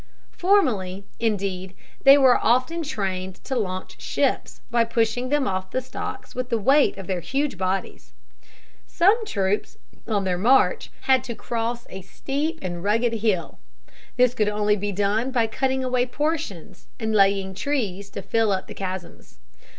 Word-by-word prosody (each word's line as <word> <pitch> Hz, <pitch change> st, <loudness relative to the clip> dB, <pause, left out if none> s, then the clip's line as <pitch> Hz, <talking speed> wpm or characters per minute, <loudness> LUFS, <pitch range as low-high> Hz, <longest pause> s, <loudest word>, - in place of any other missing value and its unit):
Formerly, 215 Hz, -, +1 dB
indeed, 195 Hz, -4 st, -2 dB, 0.3 s
they 275 Hz, +1 st, +9 dB
were 265 Hz, -3 st, +5 dB
often 255 Hz, +9 st, +2 dB
trained 190 Hz, -, -3 dB
to 265 Hz, -, -3 dB
launch 185 Hz, -5 st, -4 dB
ships, -, -, -1 dB
by 235 Hz, -1 st, +4 dB
pushing 230 Hz, +2 st, 0 dB
them 290 Hz, -1 st, +1 dB
off 185 Hz, -1 st, -2 dB
the 255 Hz, -, -1 dB
stocks 255 Hz, -, -7 dB
with 250 Hz, 0 st, -4 dB
the 230 Hz, -, +1 dB
weight 270 Hz, +6 st, +3 dB
of 195 Hz, -, -7 dB
their 185 Hz, 0 st, -2 dB
huge 270 Hz, -, -1 dB
bodies. 190 Hz, +1 st, -3 dB, 0.8 s
Some 400 Hz, +7 st, +3 dB
troops, 200 Hz, -, -1 dB, 0.3 s
on 210 Hz, -3 st, 0 dB
their 180 Hz, -2 st, -1 dB
march, 250 Hz, +7 st, +3 dB
had 260 Hz, -1 st, +3 dB
to 235 Hz, -3 st, -5 dB
cross 235 Hz, +2 st, -3 dB
a 190 Hz, -, -8 dB
steep 285 Hz, -, -3 dB
and 175 Hz, -1 st, -4 dB
rugged 230 Hz, +3 st, +2 dB
hill. 210 Hz, -6 st, -1 dB, 0.6 s
This 250 Hz, -1 st, +4 dB
could 215 Hz, -4 st, +1 dB
only 210 Hz, 0 st, +2 dB
be 205 Hz, 0 st, -3 dB
done 205 Hz, +5 st, 0 dB
by 245 Hz, -3 st, +2 dB
cutting 260 Hz, +3 st, -1 dB
away 250 Hz, -1 st, +1 dB
portions, 295 Hz, -, -3 dB
and 220 Hz, -2 st, -1 dB
laying 195 Hz, -2 st, +3 dB
trees 200 Hz, -5 st, -2 dB
to 200 Hz, -, -7 dB
fill 225 Hz, -2 st, +1 dB
up 190 Hz, -1 st, -1 dB
the -, -, -9 dB
chasms. 185 Hz, -, -7 dB
220 Hz, 160 wpm, -24 LUFS, 195-255 Hz, 0.8 s, they